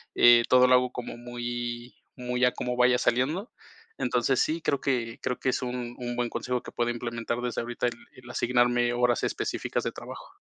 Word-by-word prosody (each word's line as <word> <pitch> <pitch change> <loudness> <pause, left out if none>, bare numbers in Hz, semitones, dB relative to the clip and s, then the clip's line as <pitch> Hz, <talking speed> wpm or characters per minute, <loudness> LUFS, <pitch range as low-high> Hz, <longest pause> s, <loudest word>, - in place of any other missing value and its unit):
eh, 120 -1 +7
todo 125 0 +6
lo 125 - +5
hago 125 0 +2
como 125 -1 -6
muy 120 0 -5 0.2
muy 125 0 0
a 125 - +4
como 125 0 -3
vaya 125 0 +5
saliendo. 150 - 0 0.5
Entonces 125 +1 +1
sí, 160 +1 0
creo 140 - 0
que 120 -4 -1
creo 125 - -2
que 130 - 0
es 130 - -1
un 125 -1 -4
un 120 -1 -4
buen 120 -1 -1
consejo 125 +1 -2
que - - -9
pueda 120 0 0
implementar 120 0 -3
desde 125 -2 -2
ahorita 120 +1 -2
el 120 - -3 0.2
el 125 -1 -14
asignarme 120 0 +2
horas 120 -1 +1
específicas - - -2
de - - -2
trabajo. - - -10
120 Hz, 195 wpm, -27 LUFS, 120-125 Hz, 0.5 s, eh